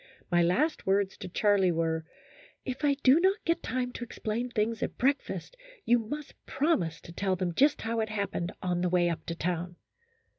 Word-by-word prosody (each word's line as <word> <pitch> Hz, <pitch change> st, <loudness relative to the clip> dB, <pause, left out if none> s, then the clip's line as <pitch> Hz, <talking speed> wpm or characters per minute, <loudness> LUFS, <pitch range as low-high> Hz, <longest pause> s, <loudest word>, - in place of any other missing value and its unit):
My 175 Hz, 0 st, +4 dB
last 265 Hz, -, +1 dB
words 195 Hz, 0 st, +2 dB
to -, -, -7 dB
Charlie 195 Hz, -1 st, +3 dB
were, 160 Hz, -1 st, -1 dB, 0.3 s
" -, -, -25 dB
If 260 Hz, +2 st, -5 dB
I 285 Hz, -1 st, +4 dB
do 270 Hz, +5 st, +7 dB
not 380 Hz, +3 st, +3 dB
get 335 Hz, 0 st, +1 dB
time 250 Hz, +1 st, -2 dB
to 245 Hz, -, -6 dB
explain 235 Hz, +1 st, -3 dB
things 225 Hz, -1 st, -1 dB
at -, -, -3 dB
breakfast, 280 Hz, -, -1 dB, 0.3 s
you 240 Hz, +1 st, +4 dB
must 285 Hz, +7 st, -6 dB
promise 190 Hz, -, 0 dB
to -, -, -11 dB
tell 190 Hz, +2 st, 0 dB
them 180 Hz, -1 st, -2 dB
just 285 Hz, -, +3 dB
how 225 Hz, 0 st, -1 dB
it 220 Hz, 0 st, -1 dB
happened 200 Hz, -4 st, -2 dB
on 175 Hz, -1 st, 0 dB
the 180 Hz, -, +1 dB
way 175 Hz, -1 st, +3 dB
up 165 Hz, -, -5 dB
to 170 Hz, -, -3 dB
town." 175 Hz, +1 st, -2 dB
210 Hz, 195 wpm, -29 LUFS, 175-260 Hz, 0.3 s, do